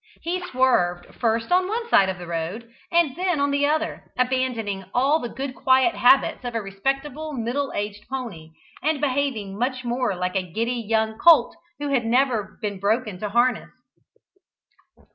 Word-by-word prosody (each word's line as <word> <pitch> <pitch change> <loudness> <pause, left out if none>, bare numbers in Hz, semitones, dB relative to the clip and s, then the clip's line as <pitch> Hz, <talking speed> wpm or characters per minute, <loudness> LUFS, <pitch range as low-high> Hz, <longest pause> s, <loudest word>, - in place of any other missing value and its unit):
He 360 +2 -2
swerved 250 - +1
first 225 +1 -1
on 365 +1 +3
one 460 +3 -3
side 195 - +4
of 190 - -3
the 175 - -8
road, 170 +7 -4 0.2
and 335 -6 +3
then 360 -2 0
on 285 0 +1
the 285 0 +2
other, 315 +2 -2
abandoning 250 -6 -1
all 275 +5 +3
the 240 - -5
good, 265 +2 -5
quiet 260 +5 +3
habits 260 +1 +4
of 245 -1 -5
a - - +1
respectable 275 +9 -3
middle 255 +3 -2
aged 205 0 -4
pony, 205 -13 -6 0.3
and 310 -1 0
behaving 255 -8 -1
much 255 +1 -1
more 245 -3 -1
like 180 +1 -3
a 190 - +2
giddy 235 +4 -1
young 220 0 0
colt 330 -3 +6 0.2
who 290 0 -3
had 260 -4 +1
never 235 -4 +1
been 200 -2 -3
broken 210 -1 0
to 210 - -3
harness. 240 +4 +1
250 Hz, 165 wpm, -23 LUFS, 210-280 Hz, 0.3 s, colt